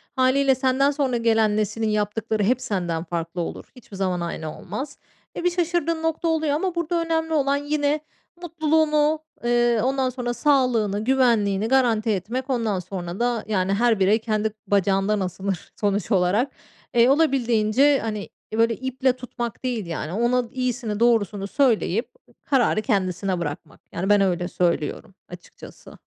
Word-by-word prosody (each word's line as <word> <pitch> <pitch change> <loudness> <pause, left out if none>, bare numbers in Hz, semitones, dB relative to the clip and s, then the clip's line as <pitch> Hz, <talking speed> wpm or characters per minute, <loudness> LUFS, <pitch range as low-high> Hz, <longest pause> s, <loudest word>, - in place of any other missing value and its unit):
Hâliyle 265 +1 +3
senden 265 +2 +2
sonra 275 -4 0
gelen 225 -2 +2
neslin 215 +1 -1
yaptıkları 210 +1 -1
hep 250 +5 +1
senden 175 -5 -2
farklı 170 0 -4
olur. 165 - -5
Hiçbir 215 -6 -12
zaman 185 -2 -1
aynı 160 -2 -5
olmaz. 260 +10 -6 0.4
E, - - -4
bir 355 - +2
şaşırdığım 340 -2 -1
nokta 325 +1 -1
oluyor 315 -2 +1
ama 355 +4 -1
burada 340 0 -1
önemli 320 -1 -1
olan 280 -2 +2
yine 290 +1 0 0.4
mutluluğunu, 310 -2 +1 0.2
eee, 240 -1 +2
ondan 265 0 +1
sonra 245 -1 -3
sağlığını, 240 -8 +1
güvenliğini 225 -6 +2
garanti 235 -4 +2
etmek, 235 +7 -2
ondan 225 -6 0
sonra 180 0 -6
da 240 -2 0
yani 195 -2 0
her 225 0 +2
birey 200 +4 +3
kendi 215 -1 -1
bacağından 200 +1 +2
asılır 190 -1 -4
sonuç 205 0 0
olarak. 200 +8 +2 0.4
Eee, 235 +2 +6
olabildiğince, 270 -2 +3
hani, 215 -2 -4 0.3
böyle 230 0 +3
iple 260 +1 0
tutmak 240 -2 -6
değil 240 -6 -2
yani 165 -1 -5
ona 240 +4 +1
iyisini 245 -4 -2
doğrusunu 210 -4 +2
söyleyip 230 -4 +1 0.3
kararı 250 -6 +2
kendisine 190 -4 -1
bırakmak. 150 -4 -6
Yani 190 +4 -2
ben 205 -1 +5
öyle 175 -2 0
söylüyorum 175 0 -1 0.2
açıkçası. 180 0 -13
230 Hz, 145 wpm, -23 LUFS, 200-270 Hz, 0.4 s, Eee